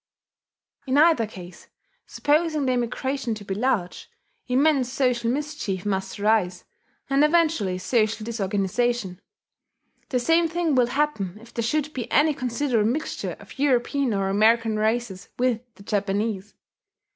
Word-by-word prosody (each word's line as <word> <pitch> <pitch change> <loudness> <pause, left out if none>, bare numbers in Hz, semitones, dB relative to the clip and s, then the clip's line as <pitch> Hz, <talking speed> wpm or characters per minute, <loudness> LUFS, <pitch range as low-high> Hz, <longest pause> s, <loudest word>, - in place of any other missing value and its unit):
In 260 +2 +1
either 310 -7 +5
case, 180 -4 -12 0.4
supposing 305 0 +1
the 255 - +2
immigration 250 0 -2
to 210 -1 -10
be 195 - -3
large, 205 -5 -1 0.4
immense 265 0 +2
social 250 -3 +1
mischief 260 -9 -3
must 195 0 -2
arise, 205 -4 +1 0.4
and 275 +1 +3
eventually 300 - +2
social 215 +2 0
disorganization. 205 -1 -1 0.9
The 255 - +1
same 330 +6 +3
thing 335 -1 0
will 250 -2 +4
happen 240 -9 -1
if 230 +1 -16
there 235 - -2
should 300 +6 -1
be 245 -3 -5
any 300 +1 +4
considerable 250 -4 0
mixture 305 +6 -3
of - - -14
European 275 -1 +1
or 195 -1 0
American 220 +3 +3
races 220 -3 -1
with 245 -2 +1
the 200 - -15
Japanese. 205 0 -2
240 Hz, 135 wpm, -24 LUFS, 210-280 Hz, 0.9 s, either